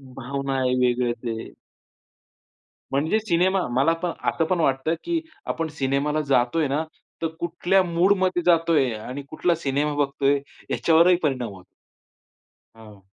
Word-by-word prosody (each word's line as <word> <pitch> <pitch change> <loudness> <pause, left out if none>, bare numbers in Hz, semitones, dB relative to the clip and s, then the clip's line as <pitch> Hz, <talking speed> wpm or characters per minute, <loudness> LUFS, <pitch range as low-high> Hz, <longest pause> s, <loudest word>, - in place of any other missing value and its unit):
भावना 135 +1 -3
आहे 125 -1 +1
वेगळं 125 -1 +2
ते. 115 -1 -5 1.4
म्हणजे 155 +10 +1
सिनेमा, 185 -1 +1
मला 140 +6 +3
पण 175 - 0 0.2
आता 165 - 0
पण 180 0 0
वाटतं 135 +1 +1
की 340 -1 0 0.3
आपण 165 0 -2
सिनेमा 140 +2 0
ला 155 0 0
जातो 130 +3 +2
आहे 155 - +2
ना 145 +4 0 0.4
तर, 165 - +1
कुठल्या 175 +3 +1
मूड 175 +3 +3
मध्ये 185 -1 +1
जातो 165 -1 +3
आहे 135 -5 +2
आणि 125 +6 -6
कुठला 170 +2 +1
सिनेमा 145 -1 -1
बघतो 140 -1 -1
आहे 140 +1 +4 0.3
याच्यावरही 170 +2 +4
परिणाम 130 -6 0
होतो. 95 -1 -13 1.1
हां 105 -3 -15
145 Hz, 150 wpm, -24 LUFS, 130-170 Hz, 1.4 s, आहे